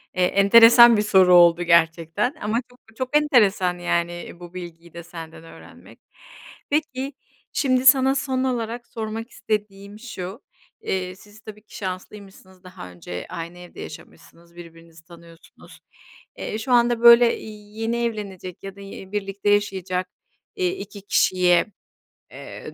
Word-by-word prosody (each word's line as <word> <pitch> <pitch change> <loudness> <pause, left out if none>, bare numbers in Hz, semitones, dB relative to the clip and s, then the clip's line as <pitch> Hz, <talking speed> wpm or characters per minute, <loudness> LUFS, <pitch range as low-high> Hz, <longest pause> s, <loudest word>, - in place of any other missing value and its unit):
Eee, 185 - +1
enteresan 230 +4 +7
bir - - +2
soru 190 -3 +4
oldu 175 0 +5
gerçekten 170 - +1
ama 220 +4 -1
çok 245 0 -22 0.2
çok 260 +3 +1
enteresan, 205 - +2
yani, 170 0 -1
eee, 175 0 -10
bu 175 0 -12
bilgiyi 170 -2 -10
de 170 - -9
senden 165 -1 -11
öğrenmek. 165 - -16 0.7
Peki, 285 -2 -2 0.4
şimdi 255 -2 +1
sana 265 0 +5
son 260 -1 -2
olarak 235 -2 -3
sormak 225 +1 -6
istediğim 205 -1 -5
şu. 210 -1 -8 0.4
Eee, 185 -1 -3
siz 210 +3 -18
tabii 210 -1 -12
ki - - -17
şanslıymışsınız 190 0 -9
daha 185 - -11
önce 90 0 -8
aynı 170 0 -7
evde 180 0 -12
yaşamışsınız 170 0 -13
birbirinizi 165 -1 -15
tanıyorsunuz. 170 -1 -17 0.6
Eee, 215 - -5
şu 250 +3 -5
anda 240 -1 +3
böyle, 235 0 +7
iii, 210 0 -12
yeni 230 +1 -1
evlenecek 200 -5 -7
ya 195 0 -8
da, 200 - -13
iii, 195 -1 -11
birlikte 200 0 -3
yaşayacak, 190 -3 -1 0.5
eee, 370 -3 0
2 205 - -10
kişiye, 180 -3 +2 0.7
eee - - -10
200 Hz, 140 wpm, -22 LUFS, 175-230 Hz, 0.7 s, enteresan